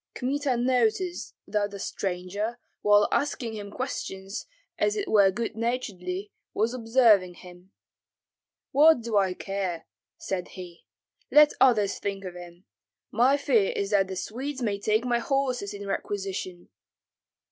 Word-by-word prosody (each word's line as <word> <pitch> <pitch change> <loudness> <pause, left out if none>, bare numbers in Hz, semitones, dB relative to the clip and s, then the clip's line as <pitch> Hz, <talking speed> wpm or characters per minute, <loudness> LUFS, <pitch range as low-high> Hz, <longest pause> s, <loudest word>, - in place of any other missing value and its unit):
Kmita 270 0 -1
noticed 250 - 0
that 210 -1 -1
the 200 - -8
stranger, 195 +4 -3 0.2
while 205 0 +5
asking 260 -5 -1
him 205 -2 -6
questions 195 -5 -5 0.3
as 420 - +2
it 405 -2 -2
were 200 -2 +5
good 225 +4 -3
naturedly, 205 -5 -3 0.2
was 225 +3 +1
observing 225 -7 +3
him. 180 +1 -15 1.0
"What 300 -1 +6
do 230 -1 -3
I 190 -2 +2
care!" 190 -4 -4 0.3
said 180 -2 -4
he; 175 -2 -10 0.4
"let 300 0 +6
others 215 -6 +4
think 195 -1 -4
of 180 - -6
him. 175 +1 -12 0.5
My 255 +6 +4
fear 240 -8 +2
is 200 +1 -2
that 195 -2 +3
the 190 - -5
Swedes 260 +7 -4
may 205 -3 -1
take 215 +3 +1
my 240 -1 +1
horses 255 -4 -1
in 200 0 -7
requisition." 195 -2 -4
210 Hz, 135 wpm, -27 LUFS, 190-250 Hz, 1.0 s, What